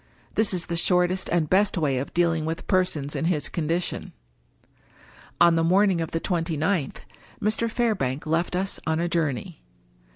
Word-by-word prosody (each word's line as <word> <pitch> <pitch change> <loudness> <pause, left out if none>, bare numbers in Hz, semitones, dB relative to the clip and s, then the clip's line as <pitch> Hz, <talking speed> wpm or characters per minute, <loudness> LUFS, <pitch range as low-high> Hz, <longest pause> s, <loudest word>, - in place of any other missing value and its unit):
This 220 -1 +3
is 180 -3 -1
the 170 - -3
shortest 180 +2 +2
and 170 -3 +1
best 190 +4 +2
way 140 -6 +1
of 135 - -5
deal 170 -1 +2
ing 160 -1 -2
with 160 +1 -4
persons 180 -7 0
in - - -1
his 165 -4 0
condition. 170 +2 -2 1.3
On 170 -1 +6
the 165 - +2
morning 185 +1 +3
of 165 - -3
the 165 - -2
twenty 165 -3 -2
ninth, 160 -2 -1 0.4
Mr. 215 +2 0
Fairbank 205 - -1
left 165 +3 0
us 190 +2 -2
on 160 0 +1
a 170 - 0
journey. 150 - -2
170 Hz, 170 wpm, -25 LUFS, 160-185 Hz, 1.3 s, On